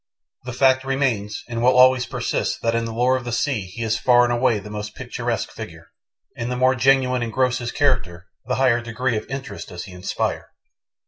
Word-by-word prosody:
The 125 - -5
fact 130 +1 +3
remains 125 -7 -1
and 115 -1 -4
will 125 +1 +4
always 130 0 +5
persist - - -2
that 115 - +1
in 115 0 0
the 115 - -4
lore 125 +3 +2
of 130 - -3
the 120 - -5
sea 120 -5 -1
he 100 +6 -6
is 115 0 0
far 120 -1 +5
and 120 0 +1
away 120 -2 +2
the 105 +1 -9
most 105 0 -6
picturesque - - -3
figure, - - -10 0.4
and 115 +2 -4
the 125 - -2
more 130 +1 +4
genuine 130 -1 +2
and 115 -1 -3
gross 130 +1 +1
his 120 -1 -4
career, 95 - 0 0.2
the 125 - 0
higher 125 -3 +3
degree 120 +1 -2
of 105 - -4
interest 135 0 -6
does 90 - -7
he 95 - -11
inspire. 90 +1 -3
120 Hz, 210 wpm, -22 LUFS, 115-130 Hz, 0.4 s, always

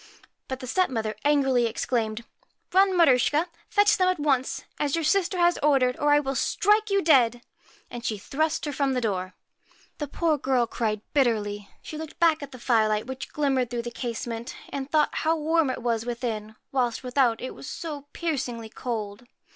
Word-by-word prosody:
But 260 0 -5
the - - -5
stepmother 235 - 0
angrily 270 -5 +3
exclaimed: 230 -1 -2 0.2
' - - -32
Run, 380 0 +4
Maruschka, 295 0 +4 0.2
fetch 410 0 +4
them 370 - +4
at 370 -3 +1
once, 270 -3 0 0.2
as 290 0 +1
your 330 - -1
sister 375 +2 +2
has 345 0 +3
ordered, 265 -4 +3
or 295 0 +2
I 290 - +6
will 270 -2 -2
strike 420 - +2
you 395 0 +2
dead; 245 -6 +4 0.2
' - - -29
and 240 -1 -7
she 220 -3 -1
thrust 310 +10 -1
her 295 - -2
from 275 -1 0
the 250 - 0
door. 185 -4 -2 0.6
The 295 - -3
poor 310 +1 0
girl 255 -2 +2
cried 220 -2 -2
bitterly; 210 -7 0
she 310 - -7
looked 320 -1 -8
back 325 -2 +4
at 280 -1 -7
the 255 - -9
firelight 220 -3 +2
which 260 +1 -7
glimmered 270 -4 +1
through 240 -1 -3
the 240 - -5
case 235 -2 -4
ment, 230 0 -5
and 275 0 -5
thought 305 -1 +2
how 325 +1 +1
warm 320 -1 +2
it 255 - -4
was 230 -2 0
within, 230 -3 -4 0.2
whilst 250 -2 0
without 250 -3 +2
it 255 - -5
was - - -10
so 295 -3 -6
piercingly 245 -9 -3
cold. 220 -1 -5
260 Hz, 190 wpm, -26 LUFS, 235-305 Hz, 0.6 s, I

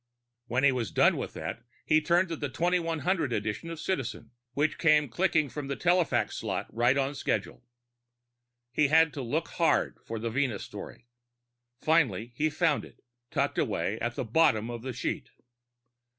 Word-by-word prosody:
When 125 +3 0
he 140 - +6
was 120 -6 -2
done - - +4
with - - -4
that, - - -5 0.2
he 155 0 +4
turned 170 +3 +2
to 165 - -2
the 145 -2 -4
2100 165 +1 0
edition 105 +8 -2
of 165 -2 -6
Citizen, 135 -9 -3 0.2
which 145 +4 0
came 150 -3 +4
clicking 155 +3 +1
from 140 +1 -6
the 140 - -2
telefax 175 -2 +2
slot - - -2
right 120 +4 +3
on 135 +1 0
schedule. 135 - -2 1.1
He 145 +3 +3
had 160 +2 +4
to 140 - -4
look 150 +7 -2
hard 165 -2 +1
for 115 - -5
the 115 +1 -3
Venus 125 -4 -1
story. 120 - -9 0.8
Finally 120 - +2
he 155 +4 +1
found 155 -1 +1
it - - -15 0.3
tucked - - 0
away - - -1
at 120 +1 -2
the - - -3
bottom 115 -3 +3
of 120 -1 -6
the 130 +2 -4
sheet. 120 - -3
145 Hz, 165 wpm, -29 LUFS, 120-165 Hz, 1.1 s, he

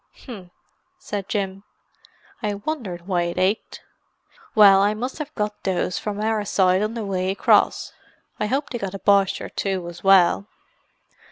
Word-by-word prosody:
"H'm!" 200 -9 -11 0.5
said 205 - -6
Jim. 195 -2 -2 0.8
"I 210 -3 -2
wondered 205 - -5
why 180 -2 0
it 170 - -4
ached! 195 +4 -1 0.7
Well 200 -3 +7
I 205 +2 +2
must 250 +7 -5
have 300 -1 -5
got 210 -1 -3
those 185 -1 -1
from 205 -1 -4
our 215 0 0
side 185 -1 +2
on 215 +2 -2
the 225 -3 -4
way 185 -1 -1
across. 195 - +2 0.5
I 210 - 0
hope 275 +6 -2
they 240 - -3
got 195 -1 -4
a - - -6
Boche 200 -1 +3
or - - -6
two 190 -3 -3
as 175 0 -10
well." 195 0 +4
200 Hz, 165 wpm, -22 LUFS, 190-215 Hz, 0.8 s, Well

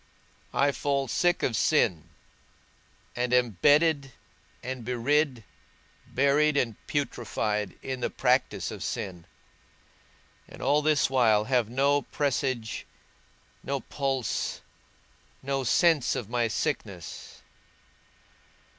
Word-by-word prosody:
I 140 +1 +3
fall 140 -1 -1
sick 175 +8 +1
of 115 - +1
sin, 100 - +2 1.1
and 125 0 -1
am 125 -2 +3
bedded 145 -3 +4 0.5
and 130 -1 -5
bedrid, 125 +1 0 0.6
buried 140 +2 +2
and 115 -5 0
putrified 110 - -2
in 130 -1 -4
the - - -1
practice - - 0
of - - -8
sin, 90 -3 -5 1.2
and - - -13
all 145 +2 +2
this 150 -1 +3
while 115 -5 +4
have 125 -2 +1
no 140 +3 +2
presage, 130 -6 -2 0.7
no 140 0 -2
pulse, 135 -3 -2 0.8
no 135 0 -1
sense 160 +2 +3
of 110 -2 -5
my 120 -1 +1
sickness. 105 - -4
130 Hz, 100 wpm, -27 LUFS, 115-145 Hz, 1.2 s, bedded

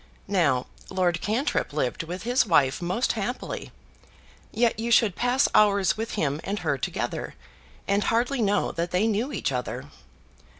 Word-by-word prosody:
Now 140 -9 +2 0.2
Lord 180 -2 0
Cantrip 220 - -1
lived 135 -4 -1
with 175 +3 -6
his 245 +3 +3
wife 150 -7 +2
most 185 +8 0
happily; 225 +3 -4 0.8
yet 230 0 +1
you 230 +1 -2
should 225 -5 +4
pass 250 +3 +2
hours 200 -3 +4
with 225 +1 -4
him 150 -6 -1
and 205 - -2
her 160 -7 0
together, - - -3 0.5
and 200 +1 +1
hardly 245 +3 +1
know 205 -1 +1
that 170 +1 -2
they 180 +5 +1
knew 225 +5 0
each - - -2
other. - - -4
200 Hz, 155 wpm, -26 LUFS, 170-230 Hz, 0.8 s, should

